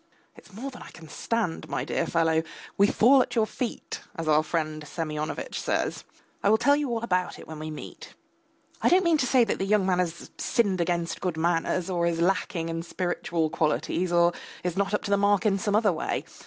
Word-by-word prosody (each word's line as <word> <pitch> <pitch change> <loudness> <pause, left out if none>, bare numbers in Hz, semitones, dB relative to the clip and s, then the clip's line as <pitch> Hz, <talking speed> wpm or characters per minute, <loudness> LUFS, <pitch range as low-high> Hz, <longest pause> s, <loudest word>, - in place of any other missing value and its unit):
It's - - -17
more 245 +8 -6
than 245 - -11
I - - -10
can 160 -1 -13
stand, 210 +1 -2
my - - -2
dear - - -1
fellow! 160 -1 +2 0.3
We 200 - +5
fall 260 +6 +5
at - - -3
your 225 -2 +3
feet, 235 +2 -5
as 165 -2 -4
our 155 0 +5
friend 155 -1 -2
Semyonovitch 150 0 -4
says. - - -1 0.4
I 200 - +3
will 220 - +5
tell 285 +5 +4
you 290 -2 -1
all 230 -1 -2
about 180 -5 0
it - - -12
when 160 -1 -8
we 155 0 -5
meet. 155 - -9 0.7
I - - +4
don't 370 +2 +5
mean 335 -3 +3
to 255 - +1
say 250 -1 +5
that 225 - -1
the - - 0
young 200 0 +2
man 185 -1 +2
has 170 -2 -3
sinned 200 -7 +1
against 170 -1 -1
good 180 -4 -2
manners, 170 +2 0
or 175 -2 0
is 165 -1 -1
lacking 170 -2 0
in 165 0 -3
spiritual 170 -2 -2
qualities, 165 +3 0
or 170 0 +4 0.3
is 180 -1 -2
not 200 +1 +1
up - - -2
to 200 - -3
the 200 - +4
mark 200 -1 +2
in 200 -2 +2
some 205 +1 0
other 210 -3 +3
way. 155 - -2
180 Hz, 220 wpm, -27 LUFS, 165-210 Hz, 0.7 s, We